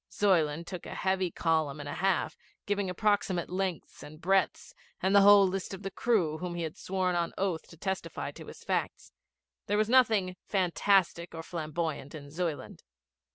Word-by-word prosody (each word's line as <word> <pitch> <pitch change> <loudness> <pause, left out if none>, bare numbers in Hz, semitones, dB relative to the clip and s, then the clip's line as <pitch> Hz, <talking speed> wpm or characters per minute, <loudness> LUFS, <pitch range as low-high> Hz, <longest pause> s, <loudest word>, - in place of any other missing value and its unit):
Zuyland 170 -5 +2
took 180 0 -7
a - - -7
heavy 190 -1 0
column 160 -3 0
and 145 - -6
a 145 - -4
half, 190 0 0 0.3
giving 200 -2 -1
approximate 190 -3 0
lengths 185 -3 -3
and 155 +1 -11
breadths, 195 +3 +1 0.3
and 190 +2 +1
the 200 - +8
whole 200 -1 +8
list 190 +1 -3
of 190 - -12
the 195 - -4
crew 180 -10 +1
whom 180 -1 -4
he 170 - -3
had 160 +1 -4
sworn 185 -2 -1
on 170 -1 -1
oath 185 -4 -1
to 165 - -15
testify 190 +3 -4
to - - -12
his - - -11
facts. - - -2 0.6
There 205 - +1
was 215 +1 +2
nothing 220 -8 +3
fantastic 185 -2 +1
or 165 - -6
flamboyant 155 -3 -4
in 145 -2 -10
Zuyland. 165 -2 -4
180 Hz, 175 wpm, -30 LUFS, 165-195 Hz, 0.6 s, the